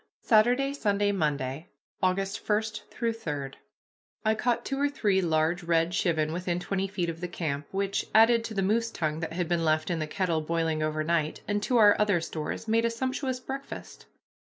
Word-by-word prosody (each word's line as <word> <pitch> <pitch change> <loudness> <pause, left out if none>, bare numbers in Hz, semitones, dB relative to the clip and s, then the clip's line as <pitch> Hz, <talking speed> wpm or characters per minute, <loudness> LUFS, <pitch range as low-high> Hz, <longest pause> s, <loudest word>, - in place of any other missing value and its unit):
X - - -22
SATURDAY, 245 +5 +4
SUNDAY, 205 -6 +1
MONDAY 150 -3 -2 0.3
AUGUST 195 +3 -1
1 210 +1 +4 0.3
3 230 -1 -1 1.1
I 220 - +4
caught 235 +2 0
two 275 - -2
or 285 - +3
three 205 -9 +1
large 165 +1 +1
red 165 0 +1
chivin 160 -4 +1
within 175 0 -2
twenty 195 +2 -2
feet 185 -3 -2
of 165 0 -5
the 180 - -2
camp, 150 -5 -3
which, 195 0 -1
added 230 +1 +6
to 220 - -6
the 195 - +1
moose 225 +4 +1
tongue 155 -7 -2
that 165 0 -4
had 175 0 -1
been 170 -1 0
left 155 +1 +1
in 170 - -1
the 155 - -2
kettle 170 -1 0
boiling 160 0 -1
over 155 0 0
night, 155 -1 0
and 205 0 0
to 245 +4 +1
our 210 -2 +7
other 205 -4 +3
stores, 160 +6 -5
made 225 +1 +3
a 235 - +2
sumptuous 260 +2 -2
breakfast. 270 +2 -8
185 Hz, 190 wpm, -28 LUFS, 165-220 Hz, 1.1 s, our